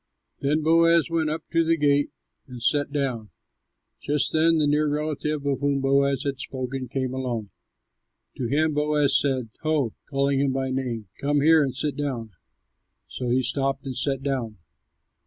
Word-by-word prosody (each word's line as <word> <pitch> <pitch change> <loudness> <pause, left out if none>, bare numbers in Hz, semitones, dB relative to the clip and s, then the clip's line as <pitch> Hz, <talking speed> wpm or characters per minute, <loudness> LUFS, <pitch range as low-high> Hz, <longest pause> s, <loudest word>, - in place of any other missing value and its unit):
Then 150 +3 0
Boaz 165 +1 +4
went 160 -2 +1
up 155 +1 -3
to 165 0 +3
the 165 0 +2
gate 145 -1 +2 0.4
and 125 -2 -9
sat 145 +4 +1
down. 130 -7 -2 0.7
Just 150 0 0
then 165 +1 +4
the 155 - +2
near 150 +1 +2
relative 150 0 -2
of 140 -2 0
whom 140 -1 +1
Boaz 140 0 +2
had 140 -3 -3
spoken 130 0 -4
came 130 0 -2
along. 120 -6 -3 0.9
To 125 - -2
him 155 +5 +1
Boaz 150 -1 +2
said, 130 -5 -1
"Ho!" 155 -7 0 0.2
calling 140 -1 +1
him 135 -1 +1
by 130 0 -1
name, 120 -5 -3
"come 145 0 +1
here 160 +1 +6
and 135 -3 -1
sit 145 +2 -2
down." 130 -7 -3 0.8
So 125 -1 -4
he 130 +2 +2
stopped 135 +2 -1
and 130 -2 -4
sat 135 0 -1
down. 125 -6 -2
140 Hz, 165 wpm, -25 LUFS, 130-150 Hz, 0.9 s, here